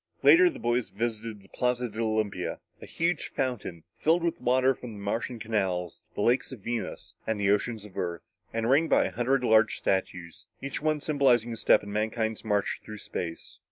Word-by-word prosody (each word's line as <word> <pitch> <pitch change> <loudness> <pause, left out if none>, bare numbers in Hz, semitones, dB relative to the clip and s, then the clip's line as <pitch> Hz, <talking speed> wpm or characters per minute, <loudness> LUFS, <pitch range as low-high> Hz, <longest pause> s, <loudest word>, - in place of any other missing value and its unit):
Later, 360 +1 +8
the 320 - -8
boys 120 -3 0
visited 110 0 -4
the - - -18
Plaza 125 0 0
de 110 0 -8
Olympia 110 -5 -1 0.2
a - - -9
huge 170 0 -1
fountain, 115 -11 -3 0.2
filled 165 +2 +3
with 170 - -1
water 130 +2 +3
taken - - -20
from 120 -3 -7
the 105 - -9
Martian 115 +4 -2
Canals, 95 -6 -2
the - - -2
lakes 125 +3 +2
of 125 -6 -9
Venus 120 +3 -4
and 110 -2 0
the 100 -1 +3
oceans 105 +1 0
of 100 - -14
Earth, 85 -2 -3 0.3
and 115 0 -1
ringed 145 +6 +4
by - - +4
a - - -3
hundred 125 +2 +1
large 110 -2 +4
statues, 90 -3 -2
each 140 +1 -4
one 155 -1 +1
symbolizing 130 -6 +2
a - - -4
step - - +4
in 100 0 -7
mankind's 110 +1 -1
march 105 -3 0
through 110 - -8
space. 85 -4 -6
115 Hz, 195 wpm, -28 LUFS, 105-125 Hz, 0.3 s, Later